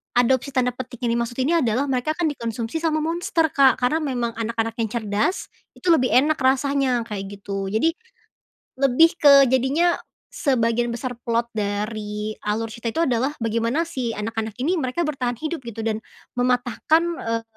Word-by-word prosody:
Adopsi 255 Hz, +3 st, +2 dB
tanda 250 Hz, -1 st, +2 dB
petik 250 Hz, -1 st, -8 dB
yang 235 Hz, -1 st, +1 dB
dimaksud 235 Hz, 0 st, -3 dB
ini 335 Hz, +5 st, +3 dB
adalah 250 Hz, +1 st, +1 dB
mereka 260 Hz, +5 st, 0 dB
akan 350 Hz, -, -3 dB
dikonsumsi 230 Hz, +2 st, -4 dB
sama 310 Hz, -1 st, 0 dB
monster, 330 Hz, -1 st, 0 dB
Kak, 270 Hz, -2 st, +5 dB
karena 300 Hz, +6 st, +2 dB
memang 250 Hz, -6 st, -2 dB
anak-anak 225 Hz, 0 st, -2 dB
yang 225 Hz, -, +1 dB
cerdas, 215 Hz, -, -1 dB, 0.2 s
itu 360 Hz, -, +1 dB
lebih 255 Hz, -6 st, +4 dB
enak 295 Hz, +5 st, +4 dB
rasanya 265 Hz, -2 st, +2 dB
kayak 200 Hz, -3 st, -6 dB
gitu. 195 Hz, -1 st, -4 dB
Jadi 220 Hz, +11 st, +2 dB, 0.9 s
lebih 275 Hz, +5 st, +6 dB
ke 280 Hz, -2 st, +8 dB
jadinya 270 Hz, +7 st, +2 dB, 0.3 s
sebagian 240 Hz, -4 st, +1 dB
besar 245 Hz, +2 st, -4 dB, 0.2 s
plot 235 Hz, 0 st, +1 dB
dari 210 Hz, 0 st, -3 dB
alur 220 Hz, +2 st, -1 dB
cerita 230 Hz, +1 st, -6 dB
itu 330 Hz, -, 0 dB
adalah 260 Hz, +2 st, 0 dB
bagaimana 230 Hz, +7 st, 0 dB
si 260 Hz, -9 st, -3 dB
anak-anak 220 Hz, 0 st, -3 dB
ini, 350 Hz, +6 st, +1 dB
mereka 260 Hz, +5 st, -1 dB
bertahan 255 Hz, -5 st, -2 dB
hidup 315 Hz, +5 st, -3 dB
gitu 225 Hz, -1 st, -6 dB
dan 220 Hz, -1 st, 0 dB, 0.4 s
mematahkan, 250 Hz, +6 st, +2 dB, 0.2 s
eee, 230 Hz, 0 st, -2 dB
245 Hz, 160 wpm, -23 LUFS, 225-280 Hz, 0.9 s, ke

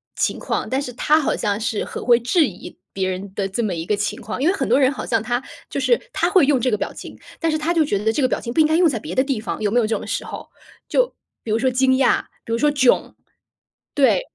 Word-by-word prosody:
情 -, -, 0 dB
况？ -, -, -3 dB
但 260 Hz, -, 0 dB
是 250 Hz, -3 st, -6 dB
他 300 Hz, +5 st, +3 dB
好 300 Hz, -, 0 dB
像 205 Hz, -1 st, -1 dB
是 220 Hz, -2 st, -1 dB
很 -, -, -7 dB
会 240 Hz, -1 st, +5 dB
质 275 Hz, +7 st, +3 dB
疑 185 Hz, -, -10 dB, 0.2 s
别 190 Hz, -1 st, -1 dB
人 190 Hz, +1 st, -5 dB
的 195 Hz, -1 st, -2 dB
这 215 Hz, +5 st, -2 dB
么 200 Hz, -4 st, -1 dB
一 165 Hz, 0 st, -4 dB
个 210 Hz, -, +1 dB
情 205 Hz, 0 st, -3 dB
况 220 Hz, +4 st, -5 dB
因 300 Hz, -, +2 dB
为 -, -, +3 dB
很 275 Hz, -, -2 dB
多 -, -, +4 dB
人 265 Hz, -1 st, +4 dB
好 275 Hz, -, -6 dB
像 225 Hz, -2 st, 0 dB
他 240 Hz, +2 st, -1 dB, 0.3 s
就 -, -, -3 dB
是 480 Hz, -, +3 dB
他 345 Hz, -, 0 dB
会 370 Hz, -7 st, +5 dB
用 275 Hz, -3 st, +3 dB
这 255 Hz, -, +2 dB
个 210 Hz, -, +1 dB
表 -, -, -4 dB
情， -, -, -10 dB, 0.2 s
但 330 Hz, -1 st, +1 dB
是 310 Hz, -, +1 dB
他 320 Hz, +3 st, 0 dB
就 325 Hz, -2 st, +3 dB
觉 205 Hz, -9 st, 0 dB
得 220 Hz, +1 st, +1 dB
这 285 Hz, -, 0 dB
个 255 Hz, -, +4 dB
表 -, -, -1 dB
情 235 Hz, -, -5 dB
不 320 Hz, -, 0 dB
应 305 Hz, -, +5 dB
该 315 Hz, -, +1 dB
用 345 Hz, -1 st, +5 dB
在 240 Hz, -7 st, -1 dB
别 -, -, -7 dB
的 260 Hz, -, +3 dB
地 270 Hz, -5 st, -2 dB
方， 220 Hz, -, -4 dB
有 210 Hz, -, +1 dB
没 245 Hz, -, +3 dB
有 230 Hz, -, +2 dB
这 225 Hz, -, 0 dB
种 -, -, -8 dB
时 -, -, -2 dB
候？ -, -, -8 dB, 0.4 s
就， -, -, +1 dB, 0.3 s
比 220 Hz, -, -4 dB
如 220 Hz, -, +2 dB
说 260 Hz, -, +2 dB
惊 260 Hz, +1 st, +2 dB
讶， 265 Hz, -, +3 dB, 0.2 s
比 -, -, -6 dB
如 230 Hz, -, +2 dB
说 295 Hz, +5 st, +3 dB
“囧”。 260 Hz, -4 st, +2 dB, 0.8 s
对， 285 Hz, -, +4 dB
255 Hz, 315 characters per minute, -21 LUFS, 215-295 Hz, 0.8 s, 会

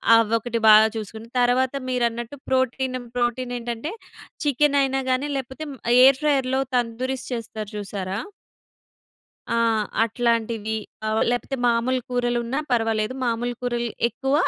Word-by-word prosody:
అవొకటి 230 Hz, +1 st, +1 dB
బాగా 215 Hz, +1 st, +8 dB
చూసుకుని, 220 Hz, +1 st, -6 dB
తర్వాత 250 Hz, +2 st, +2 dB, 0.2 s
మీరన్నట్టు 240 Hz, 0 st, -1 dB
ప్రోటీనమ్ 260 Hz, -1 st, 0 dB
ప్రోటీన్ 245 Hz, +1 st, -1 dB
ఏంటంటే 235 Hz, +5 st, -4 dB, 0.5 s
చికెన్ 290 Hz, +1 st, +3 dB
అయినా 270 Hz, 0 st, +1 dB
గాని 255 Hz, +3 st, +1 dB
లేకపోతే 265 Hz, +3 st, -5 dB
మ్ -, -, -11 dB, 0.3 s
ఎయిర్ 265 Hz, 0 st, +6 dB
ఫ్రైయర్‌లో 270 Hz, -3 st, +2 dB
తందూరిస్ 250 Hz, +2 st, -1 dB
చేస్తారు 220 Hz, -3 st, -5 dB
చూసారా? 195 Hz, -1 st, -4 dB, 1.3 s
ఆ! -, -, +2 dB, 0.5 s
అట్లాంటివి. 230 Hz, -1 st, 0 dB, 0.3 s
ఆహ్, 215 Hz, 0 st, +1 dB
లేపోతే 245 Hz, +2 st, -2 dB
మామూలు 240 Hz, +2 st, +2 dB
కూరలున్నా 245 Hz, +1 st, 0 dB
పర్వాలేదు. 225 Hz, -1 st, +1 dB
మామూలు 240 Hz, +1 st, -1 dB
కూరలు 240 Hz, -1 st, -1 dB, 0.2 s
ఎక్కువ. 265 Hz, +4 st, -2 dB
240 Hz, 115 wpm, -23 LUFS, 230-260 Hz, 1.3 s, బాగా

